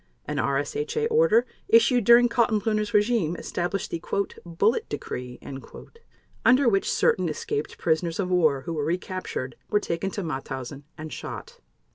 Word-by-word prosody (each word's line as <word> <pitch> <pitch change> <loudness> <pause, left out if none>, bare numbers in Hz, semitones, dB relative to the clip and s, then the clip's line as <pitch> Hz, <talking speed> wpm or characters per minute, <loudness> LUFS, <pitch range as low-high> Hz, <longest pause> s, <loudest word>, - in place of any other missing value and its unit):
An - - -4
RSHA 440 - -1
order 470 0 +4 0.2
issued 230 0 +5
during 235 +2 +7
Kaltenbrunner's 220 -2 +1
regime 210 -6 +2
established 175 +3 -3
the 165 - -3 0.4
"Bullet 180 +7 0
Decree," 125 -3 -5 1.1
under 255 +1 +5
which 195 -4 +2
certain 180 -3 +2
escaped 150 -1 -3
prisoners 165 +1 0
of 185 -2 -1
war 155 -7 +3
who 165 +6 -5
were 150 -2 -2
recaptured 170 -6 -3
were 210 - +3
taken 180 0 -2
to 200 0 -4
Mauthausen 135 -2 -5
and 155 -1 -7
shot. - - -8
180 Hz, 135 wpm, -25 LUFS, 155-230 Hz, 1.1 s, during